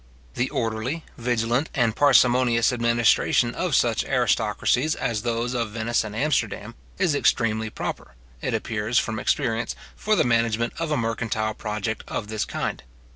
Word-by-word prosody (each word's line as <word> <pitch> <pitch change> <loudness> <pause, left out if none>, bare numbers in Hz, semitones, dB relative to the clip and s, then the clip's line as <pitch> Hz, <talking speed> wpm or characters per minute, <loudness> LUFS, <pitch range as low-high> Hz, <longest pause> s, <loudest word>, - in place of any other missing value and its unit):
The 125 - -1
orderly, 115 +8 -2
vigilant, 120 +3 0
and 115 -5 +2
parsimonious 125 -3 +4
administration 120 -1 +2
of - - -1
such - - +2
aristocracies 125 +7 +1
as 110 -3 -2
those 120 +1 -1
of 120 -3 -1
Venice 115 +2 0
and 105 -1 -7
Amsterdam, 115 -5 -1 0.2
is 180 -5 +2
extremely 110 -6 +1
proper, 60 - -6 0.3
it - - -1
appears 110 +1 -1
from 110 -1 0
experience, 115 0 0 0.2
for 215 0 +1
the - - +3
management 115 -1 +1
of 165 -1 -2
a 150 - +1
mercantile 115 -1 -1
project 105 0 -4
of 105 - -4
this 110 -1 -2
kind. - - -3
115 Hz, 145 wpm, -24 LUFS, 110-125 Hz, 0.3 s, parsimonious